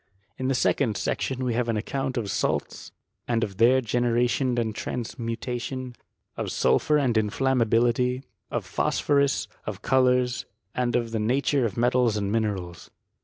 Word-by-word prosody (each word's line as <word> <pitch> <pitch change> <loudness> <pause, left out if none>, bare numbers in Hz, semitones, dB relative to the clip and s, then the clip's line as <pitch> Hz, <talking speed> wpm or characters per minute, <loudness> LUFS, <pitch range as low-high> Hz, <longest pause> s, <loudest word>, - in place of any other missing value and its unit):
In 130 - -1
the 135 - +1
second 115 -3 +1
section 130 -1 -2
we 120 - 0
have 120 0 0
an 115 - +1
account 135 +4 -2
of 105 -4 -2
salts, - - -2 0.4
and 115 -1 +1
of 95 -3 -4
their 125 +4 +5
generation 120 +2 +1
and 110 -2 0
transmutation, 120 +2 -4 0.4
of - - -3
sulphur 65 - +3
and 130 -5 +1
in 105 -1 0
flammability, 125 +1 +2 0.3
of - - -3
phosphorus, 140 -2 +1 0.2
of - - -5
colours, 125 -1 +2 0.3
and 125 -2 0
of 120 -2 0
thf 110 -1 -1
nature 130 +3 +1
of 105 - -3
metals 120 -2 +2
and 100 -1 -1
minerals. 100 -6 -2
120 Hz, 150 wpm, -26 LUFS, 115-130 Hz, 0.4 s, their